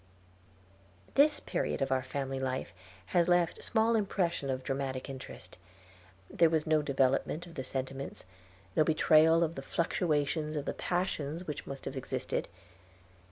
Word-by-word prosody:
This 290 +1 +5
period - - -2
of 135 -1 -1
our 130 0 +2
family 135 +1 -3
life 130 -8 -3 0.4
has 175 -1 +4
left 175 -1 +2
small 225 0 +2
impression 185 -8 0
of 130 0 -2
dramatic 135 -1 -3
interest. 135 -2 -9 0.7
There 165 - +4
was 160 -1 +1
no 155 -1 +3
development 140 +3 +1
of 170 - -12
the 130 - -4
sentiments, 135 -2 -5 0.5
no - - +5
betrayal 160 +1 +5
of 165 0 -1
the 135 - -6
fluctuations 155 -1 0
of 145 -1 -2
the - - -2
passions 175 -2 -2
which 150 -4 -5
must 135 0 -7
have 140 - -4
existed. 130 - -3
150 Hz, 145 wpm, -31 LUFS, 135-170 Hz, 0.7 s, This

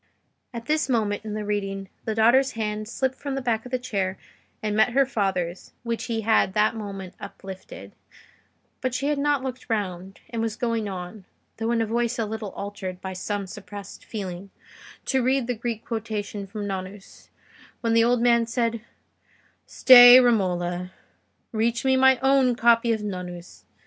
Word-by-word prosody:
At 235 -2 -7
this 305 0 +1
point 215 -5 0
in 215 -1 -5
the 215 -1 -4
reading, 195 -1 -3 0.2
the 220 - -2
daughter's 250 +4 +4
hand 215 -1 -3
slipped 260 +2 -1
from 280 -1 -4
the - - -1
back 235 -2 -1
of - - -14
the 255 - +1
chair 195 -7 -2 0.5
and 210 -1 -1
met 220 +3 +3
her 275 +1 +4
father's, 190 -7 -2
which 230 -1 -3
he 230 -2 -2
had 220 -3 +2
that 215 +1 +3
moment 195 -4 -7
uplifted; 195 -1 -10 0.9
but 255 -2 -1
she 275 +3 -1
had 295 -1 0
not 290 -2 +1
looked 255 -1 -6
round, 195 -3 -3
and 230 -1 -2
was 225 -1 -2
going 230 -3 -1
on, 185 +1 -7 0.3
though 225 - -2
with 235 0 +1
a - - +1
voice 235 +2 -1
a 225 - 0
little 215 -1 -5
altered 200 -2 -6
by 190 0 -6
some 200 +2 -3
suppressed 200 0 -10
feeling, 195 -3 -6 0.6
to 265 -1 +1
read 260 +1 +1
the 250 - -1
Greek 230 -1 -5
quotation 210 -3 -4
from 205 +1 -6
Nonnus, 190 0 -7 0.5
when 230 -1 +1
the 230 0 +5
old 240 0 +2
man 235 -1 +4
said— 230 -1 -1 0.9
"Stay, 245 -1 +9
Romola; 180 -6 +1 0.6
reach 230 +2 0
me 265 0 +4
my 265 0 +5
own 265 -2 +4
copy 235 0 +4
of 220 -2 -1
Nonnus. 180 -3 -7
220 Hz, 170 wpm, -25 LUFS, 200-245 Hz, 0.9 s, Stay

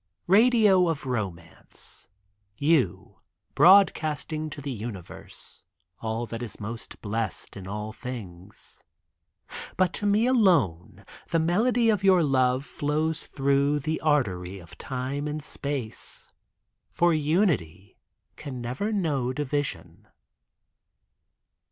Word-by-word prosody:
Radio 210 -2 +5
of 155 -4 -3
romance, 95 -9 -6 0.5
You 145 - +1 0.3
Broadcasting 155 -3 +4
to 145 - -8
the 140 0 -5
universe 105 -6 -8 0.4
All 115 +1 -3
that 115 0 -6
is 115 -5 -6
most 115 +2 -7
blessed 110 0 -3
In 95 -2 -8
all 105 +2 -5
things, 105 -6 -9 1.0
But 185 -1 +2
to 205 - -1
me 210 +3 +3
alone 180 - +2 0.2
The 165 - +2
melody 225 +8 +3
of 205 -3 -1
your 185 -3 +5
Love 130 -1 +2
Flows 155 +3 -2
through 140 +1 +1
The 155 +3 -2
artery 100 - 0
Of 85 -3 -13
time 135 +3 -3
and 150 0 -4
Space, 140 -7 -5 0.6
For 175 0 +2
unity, 145 - 0 0.4
Can 140 -4 -7
never 125 - -3
know 150 - 0
Division. 145 +1 -3
140 Hz, 110 wpm, -26 LUFS, 115-165 Hz, 1.0 s, Radio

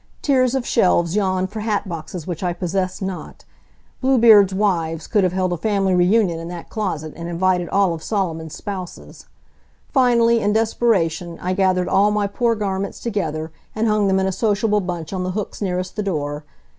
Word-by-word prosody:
Tiers 260 -2 +2
of 260 -2 -1
shelves 175 -4 +2
yawned 190 -2 0
for 220 - -5
hat 210 -2 -1
boxes 165 -1 -6
which 175 -3 -5
I 180 -2 0
possessed 185 +2 -2
not. 190 -1 -6 0.6
Bluebeard's 230 -7 +6
wives 170 -5 0
could 210 -4 +1
have 185 - +2
held 185 -1 0
a - - -2
family 195 0 +1
reunion 180 -1 +3
in 165 - -7
that 175 -1 -8
closet 160 -8 -3
and 170 0 -6
invited 180 0 0
all 195 -3 +2
of 165 - -6
Solomon's 165 -6 -3
spouses. 185 -3 -8 0.7
Finally, 235 -3 +4
in 205 -1 +1
desperation, 185 -7 0
I 180 +1 -2
gathered 185 -2 +1
all 200 +2 +3
my 210 -1 0
poor 230 +3 0
garments 200 -2 -3
together 160 -8 -3 0.2
and 220 +1 0
hung 210 -1 +2
them 190 0 +2
in 190 - +1
a 190 - 0
sociable 210 +1 +1
bunch 175 -2 -5
on 185 - -2
the 185 0 -3
hooks 210 - -5
nearest 180 -2 -2
the 210 - -2
door. 150 -6 -3
190 Hz, 180 wpm, -21 LUFS, 175-210 Hz, 0.7 s, Bluebeard's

